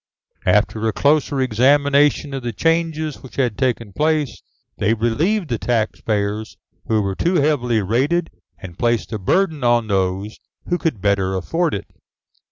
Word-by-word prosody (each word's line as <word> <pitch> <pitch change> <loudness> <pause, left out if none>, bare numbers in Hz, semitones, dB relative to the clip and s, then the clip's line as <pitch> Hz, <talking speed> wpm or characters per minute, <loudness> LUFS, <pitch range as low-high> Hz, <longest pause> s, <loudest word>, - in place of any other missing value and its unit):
After 110 0 +2
a 110 - 0
closer 145 -1 +2
examination 140 +4 +3
of 135 - -3
the 120 -1 -3
changes 160 +1 -1
which 130 - -13
had 125 -5 0
taken 115 -5 -1
place, 150 0 0 0.4
they 110 +2 +2
relieved 155 - 0
the 115 -3 -1
taxpayers 110 -2 -1 0.3
who 110 -2 +1
were 100 0 -1
too 175 - 0
heavily 130 - +1
rated 140 - 0 0.3
and 90 -3 -11
placed 120 -1 0
the 110 - -3
burden 160 - +1
on 120 -1 +3
those 95 0 -1 0.3
who 175 0 0
could 140 - -2
better 100 -2 +1
afford 165 - -1
it. 100 - -5
120 Hz, 150 wpm, -20 LUFS, 105-150 Hz, 0.4 s, examination